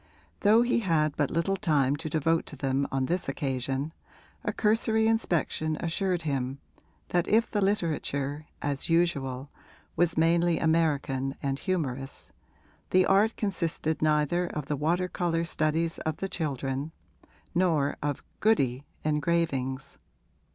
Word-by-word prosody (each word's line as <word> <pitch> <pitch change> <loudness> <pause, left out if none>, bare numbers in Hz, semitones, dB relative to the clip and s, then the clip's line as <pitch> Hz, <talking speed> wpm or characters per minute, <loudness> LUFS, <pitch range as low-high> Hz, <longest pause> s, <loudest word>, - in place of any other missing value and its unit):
Though 220 +3 +5
he 240 0 +2
had 155 -8 +1
but 145 - +1
little 170 +4 0
time 145 -7 +2
to 155 +2 -5
devote 165 +2 +1
to - - -8
them 135 0 0
on 135 -1 0
this 175 +5 -1
occasion 135 +1 -2 0.5
a - - 0
cursory 220 +1 +2
inspection 170 -8 +1
assured 175 +1 -1
him 135 -3 -2 0.5
that 175 -1 +1
if 225 +2 +3
the 205 - 0
literature, 155 -6 -1 0.2
as 145 +1 -2
usual, 140 -6 +1 0.4
was 170 0 +2
mainly 170 +1 +3
American 145 -5 +1
and 135 0 -1
humorous 135 -8 -3 0.6
the 185 0 +4
art 205 +4 +3
consisted 165 -6 -1
neither 155 +3 +2
of 150 -4 -4
the 145 - -1
water 170 +6 +1
colour 170 -2 -1
studies 165 0 0
of 155 -1 -2
the 195 - -3
children 140 -3 -3 0.6
nor 160 -5 +2
of 145 -1 -2 0.2
'goody' 140 - +2 0.2
engravings. 150 -4 -1
160 Hz, 130 wpm, -28 LUFS, 140-175 Hz, 0.6 s, Though